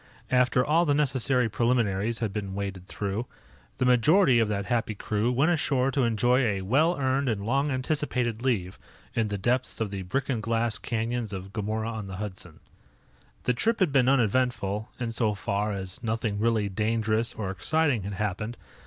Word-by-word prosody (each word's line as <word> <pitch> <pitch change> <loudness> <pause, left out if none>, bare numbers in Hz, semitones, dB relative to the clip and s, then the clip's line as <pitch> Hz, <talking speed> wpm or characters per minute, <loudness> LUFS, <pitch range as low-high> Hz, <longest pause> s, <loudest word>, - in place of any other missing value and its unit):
After 125 0 +3
all 165 +3 +3
the 145 - +3
necessary 130 -4 +2
preliminaries 115 -2 +1
had 100 - -4
been 100 -2 -4
waded 95 -2 -5
through, 100 +4 -3 0.5
the 130 - +1
majority 125 - +5
of 115 - +3
that 100 -2 -2
happy 115 -2 -1
crew 105 +3 -1
went 140 +7 +3
ashore 135 -5 +1
to 135 -2 +1
enjoy 120 +3 +3
a 100 -6 0
well 150 - +2
earned 135 0 +1
and 100 -3 -2
long 135 +5 +1
anticipated 130 -4 -1
leave 105 -8 -1 0.3
in 115 -1 +1
the 100 -1 -3
depths 125 +6 0
of 110 -3 -2
the 100 -1 -4
brick 135 +9 -2
and 120 -5 -1
glass 115 +1 0
canyons 115 -1 -2
of 95 0 -7
Gomorrah 110 +1 -2
on 110 -3 -5
the 95 - -6
Hudson. 95 -5 -7 0.8
The 125 - +2
trip 225 - 0
had 185 -6 +3
been 130 -2 +4
uneventful, 115 -4 +1
in 120 -2 -2
so 110 -2 0
far 100 +1 -1
as 95 -2 -6
nothing 110 -2 -2
really 110 -2 +2
dangerous 110 +2 0
or 100 -3 -3
exciting 135 - +1
had 100 +2 -5
happened. 105 +3 -3
115 Hz, 180 wpm, -27 LUFS, 105-130 Hz, 0.8 s, majority